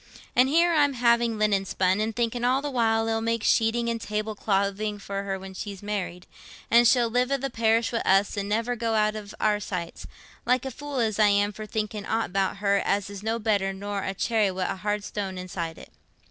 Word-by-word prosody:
An' 250 +1 +5
here 335 +4 +3
I'm 290 -3 +3
having 235 -2 +2
linen 210 -2 +2
spun, 190 +1 +1
an' 220 +1 -1
thinking 235 +1 -1
all 255 +2 +3
the 290 - -3
while 225 -3 +2
it'll 225 0 0
make 230 -1 -1
sheeting 230 +1 +2
and 230 -1 -2
table 215 +1 -3
clothing 205 +1 -1
for 200 -1 -5
her 195 -1 -3
when 190 0 -9
she's 200 0 -7
married, 190 -4 -4 0.5
an' 235 +1 +6
she'll 240 0 +4
live 245 +3 0
i' 275 - +2
the 275 +1 -4
parish 225 0 +2
wi' 230 - +1
us, 195 +2 +2
and 200 0 -3
never 230 +3 0
go 230 -1 -1
out 215 0 +2
of 210 -1 -8
our 210 -1 +2
sights—like 205 +7 -4
a 265 - -3
fool 290 +2 -6
as 220 -3 0
I 210 - +6
am 205 0 +2
for 215 +1 -8
thinking 210 -1 -3
aught 225 0 0
about 195 +2 0
her, 200 0 +2
as 200 0 0
is 200 -1 -8
no 225 +2 -1
better 205 -4 0
nor 200 +1 -4
a 195 - -3
cherry 215 0 +1
wi' 185 0 -3
a - - -2
hard 205 +2 -2
stone 195 -3 -4
inside 175 -3 -5
it." - - -13
215 Hz, 220 wpm, -26 LUFS, 200-230 Hz, 0.5 s, an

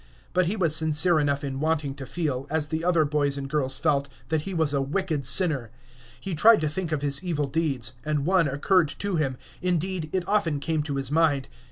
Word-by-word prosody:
But 180 -1 +2
he 200 - 0
was 170 -7 +1
sincere 160 +2 +3
enough 145 -1 0
in 135 -1 -4
wanting 150 -2 0
to 135 -1 -9
feel, 140 -6 -3
as 155 -1 -1
the 160 0 -2
other 170 -3 +3
boys 145 -1 0
and 135 -1 -4
girls 135 -2 0
felt, 140 -3 +1 0.2
that 160 -1 +1
he 190 +5 -6
was 160 -3 +1
a 140 - +1
wicked 150 -1 -1
sinner. 140 - +2 0.5
He 190 +8 -5
tried 215 +8 +6
to 155 - 0
think 160 +2 -3
of 150 -2 -1
his 140 +3 -1
evil 160 -5 -1
deeds; 135 -5 -1
and 150 -2 -1
one 180 -2 +3
occurred 155 +5 +2
to 200 -3 -1
him; 135 -4 -1 0.2
indeed, 180 -2 -1
it 185 -2 -2
often 170 -8 +1
came 155 +1 -1
to 145 -2 -4
his 135 0 -2
mind. 150 -4 +2
155 Hz, 215 wpm, -25 LUFS, 140-170 Hz, 0.5 s, tried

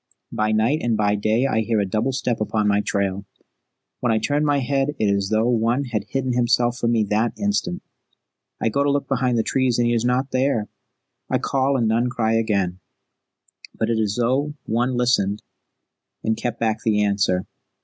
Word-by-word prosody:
By 110 0 0
night 110 +8 +2
and 115 -2 0
by 105 -1 +2
day 110 +4 +1
I 110 - +1
hear 110 0 0
a 100 - +1
double 110 +7 -1
step 125 -3 -2
upon 110 0 0
my 100 0 +3
trail. 100 -1 -1 0.8
When 125 - +1
I 110 - +2
turn 145 +7 0
my 145 -1 +2
head 140 +2 0
it 110 - 0
is 100 -1 +1
as - - -5
though 110 +2 +2
one 120 +3 +1
had 120 -5 -3
hidden 130 -2 -2
himself 120 0 +1
from 115 - +1
me 110 -2 +2
that 110 +3 +1
instant. 205 - -1 0.8
I - - +1
go 140 +6 +1
to 145 - +1
look 140 -1 0
behind 125 -3 0
the 115 - +2
trees 130 -1 +1
and 120 - +2
he 120 - +2
is 115 -1 +1
not 125 +2 0
there. 130 -5 0 0.6
I - - +2
call 135 0 0
and 115 -3 +1
none 115 +3 +1
cry 115 -3 0
again; 100 -5 0 1.0
but 110 +1 0
it 115 - 0
is 105 -1 -1
as 120 - +1
though 140 +5 0
one 120 +3 0
listened 105 -5 +1 0.8
and 110 - +1
kept 120 -1 -4
back 110 -1 0
the 105 -2 +2
answer. 100 -3 +1
115 Hz, 200 wpm, -22 LUFS, 110-130 Hz, 1.0 s, my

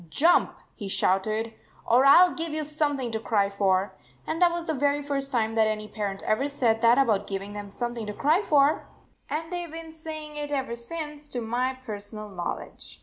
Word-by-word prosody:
"Jump," 325 - +3 0.2
he 205 - -7
shouted, 215 +4 +1 0.3
"or 245 +3 +5
I 285 +6 +9
ll 360 - -2
give 330 -1 -3
you 310 0 -1
something 290 -4 -1
to 220 - -2
cry 205 -3 +1
for." 195 -1 +1 0.3
And 330 - -3
that 350 -1 +6
was 340 0 -3
the 320 - -1
very 285 +1 +1
first 275 -1 -2
time 225 -3 +1
that 220 -1 +3
any 215 0 -2
parent 205 -3 -4
ever 240 +6 +1
said 235 -6 +1
that 235 +1 +5
about 230 -8 +2
giving 195 +1 -4
them 205 -1 -7
something 240 +1 -4
to 210 - -4
cry 310 - +2
for, 295 -6 +3 0.4
and 325 +3 -3
they 350 0 -2
Ve - - -14
been 325 0 -7
saying 310 -1 -7
it 295 0 -4
ever 270 -4 -1
since, 295 +4 -5
to 250 - -3
my 245 +3 -1
personal 210 -1 -7
knowledge. 180 -3 -6
255 Hz, 205 wpm, -26 LUFS, 215-300 Hz, 0.4 s, I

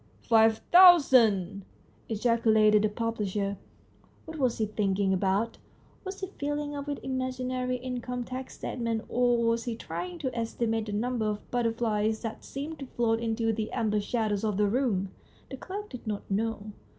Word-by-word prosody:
" - - -32
Five 225 -1 +5
thousand! 245 - +6 0.2
" - - -33
ejaculated 220 -2 +3
the 215 - +2
publisher. 210 -3 -2 0.7
What 320 -2 -8
was 255 -4 +1
he 220 - +1
thinking 200 -2 0
about? 195 +4 0 0.4
Was 385 0 -7
he 380 - -2
filling 290 0 -2
up 285 0 -5
an 285 -1 -2
imaginary 255 -1 -2
income 250 0 -4
tax 255 +2 -7
statement, 230 -2 -3
or 245 -1 +2
was 230 0 +1
he 235 -2 -2
trying 355 +9 -6
to 260 -6 -4
estimate 225 -1 -1
the - - -4
number 230 +1 -1
of 210 -1 -4
butter 240 -2 +1
flies 220 -1 -1
that 225 -1 -5
seemed 290 +3 -6
to 275 - -7
float 230 -2 0
in 225 -1 -1
the 225 -1 -1
amber 215 -3 0
shadows 215 -2 -1
of 210 -3 0
the 210 - +3
room? 205 -4 0 0.4
The 265 - -5
clerk 410 +8 -7
did 250 -3 -9
not 210 -1 -3
know. 215 0 -2
230 Hz, 170 wpm, -28 LUFS, 215-255 Hz, 0.7 s, thousand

